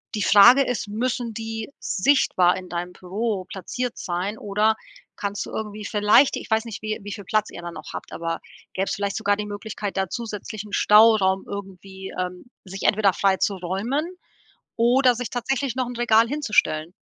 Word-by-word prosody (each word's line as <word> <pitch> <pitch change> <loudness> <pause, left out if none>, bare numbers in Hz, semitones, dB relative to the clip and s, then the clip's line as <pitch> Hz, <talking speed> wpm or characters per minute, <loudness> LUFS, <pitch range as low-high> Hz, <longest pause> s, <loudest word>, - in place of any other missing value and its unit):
Die 210 - -2
Frage 240 +7 +8
ist, 250 -5 -3
müssen 235 +2 -2
die 225 0 -5
sichtbar 185 -6 +2
in 185 -1 -8
deinem 175 +1 -4
Büro 195 +2 -3
platziert 235 +6 -5
sein 185 +5 -3
oder 210 +2 +1 0.4
kannst 200 0 -3
du - - -10
irgendwie 210 -1 -5
vielleicht, 210 +7 +4
ich - - -9
weiß 220 +1 +2
nicht, 225 -1 -7
wie 215 +1 -3
wie 205 0 -6
viel 200 0 -8
Platz 215 +3 0
ihr 175 - -8
da 175 - -6
noch 155 -2 -10
habt, - - -7
aber 165 0 -3 0.3
gäbe 190 - -1
es - - -1
vielleicht 200 0 -2
sogar 205 -2 +1
die 210 - -3
Möglichkeit, 205 0 -5
da 190 -2 0
zusätzlichen 215 -2 -6
Stauraum 210 -3 +5
irgendwie, 190 -1 -8
ähm, 180 0 -4 0.2
sich 195 +1 -8
entweder 205 -2 +3
frei 190 +1 +2
zu 200 - 0
räumen 195 - -2 0.7
oder 245 +2 +4
sich 240 -1 -4
tatsächlich 255 +1 -2
noch 255 -1 0
'n 245 - -7
Regal 230 -1 +4
hinzustellen? 210 - 0
210 Hz, 180 wpm, -23 LUFS, 190-230 Hz, 0.7 s, Frage